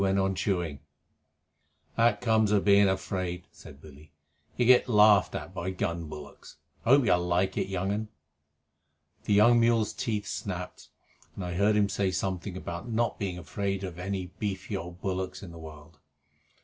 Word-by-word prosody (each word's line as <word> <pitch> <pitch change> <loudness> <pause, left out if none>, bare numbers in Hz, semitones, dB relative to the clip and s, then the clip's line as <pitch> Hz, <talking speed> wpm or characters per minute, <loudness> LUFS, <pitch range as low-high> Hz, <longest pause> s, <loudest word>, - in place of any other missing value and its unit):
They 100 - +2
went 95 0 +1
on 95 0 +1
chewing. 90 -6 -2 1.2
"That 115 -3 +3
comes 110 -3 +2
of 105 -2 +2
being 100 0 +6
afraid," 90 -2 -3
said 70 - -14
Billy. 75 0 -15 0.5
"You 120 - +2
get 125 +1 +5
laughed 105 -3 +5
at 95 - -6
by 95 -1 -3
gun 85 -3 -3
bullocks. 75 -2 -11 0.3
I - - -2
hope 140 0 +6
you - - +4
like 90 +2 +1
it, - - -1
young 95 0 -2
un." 105 +2 -2 1.2
The - - +1
young 120 +4 +6
mule's 115 -2 +2
teeth 105 -3 -2
snapped, 90 -3 -6 0.5
and 95 - -5
I 90 - -4
heard 100 +4 +2
him 105 -1 +3
say 100 -1 0
something 95 0 -3
about 85 +4 -6
not 115 -1 0
being 95 -3 -3
afraid 95 +3 -3
of 90 -2 -6
any 95 -1 -4
beefy 100 0 -3
old 90 -1 -7
bullock 95 0 -3
in 90 - -9
the 85 - -11
world. 80 -1 -12
95 Hz, 175 wpm, -28 LUFS, 90-105 Hz, 1.2 s, being